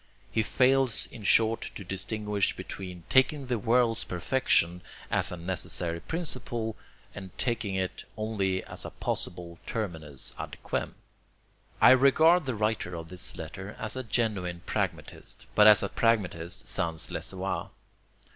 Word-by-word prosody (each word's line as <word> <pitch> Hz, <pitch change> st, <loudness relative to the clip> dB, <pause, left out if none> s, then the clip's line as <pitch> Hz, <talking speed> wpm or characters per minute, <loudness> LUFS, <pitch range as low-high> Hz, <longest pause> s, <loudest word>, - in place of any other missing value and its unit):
He 110 Hz, -, +2 dB
fails 130 Hz, +1 st, +2 dB
in 115 Hz, -, -10 dB
short 110 Hz, +2 st, +4 dB
to 100 Hz, -, -6 dB
distinguish 100 Hz, +2 st, -1 dB
between 90 Hz, -3 st, -7 dB
taking 135 Hz, +2 st, +3 dB
the 125 Hz, -3 st, -1 dB
world's 115 Hz, 0 st, +2 dB
perfection 90 Hz, -2 st, +1 dB, 0.3 s
as -, -, +2 dB
a 90 Hz, -, -5 dB
necessary 85 Hz, -1 st, -2 dB
principle, 120 Hz, -, -3 dB, 0.4 s
and 95 Hz, -2 st, -9 dB
taking 115 Hz, -5 st, -1 dB
it 95 Hz, -1 st, -2 dB
only 100 Hz, -4 st, -1 dB
as -, -, -6 dB
a -, -, -5 dB
possible 85 Hz, -1 st, -4 dB
terminus 80 Hz, -, -3 dB
ad -, -, -6 dB
quem. -, -, -2 dB, 0.8 s
I -, -, +8 dB
regard 155 Hz, +5 st, +5 dB
the 130 Hz, -, -1 dB
writer 105 Hz, -4 st, -1 dB
of 80 Hz, -1 st, -7 dB
this 90 Hz, +2 st, -1 dB
letter 95 Hz, +6 st, -7 dB
as 110 Hz, +2 st, -4 dB
a 130 Hz, -, -2 dB
genuine 100 Hz, -7 st, -1 dB
pragmatist, -, -, -3 dB
but 105 Hz, 0 st, +7 dB
as 105 Hz, -1 st, +8 dB
a -, -, -1 dB
pragmatist 95 Hz, -7 st, 0 dB
sans 80 Hz, -1 st, -1 dB
le -, -, -3 dB
savoir. -, -, -3 dB
105 Hz, 140 wpm, -29 LUFS, 90-120 Hz, 0.8 s, I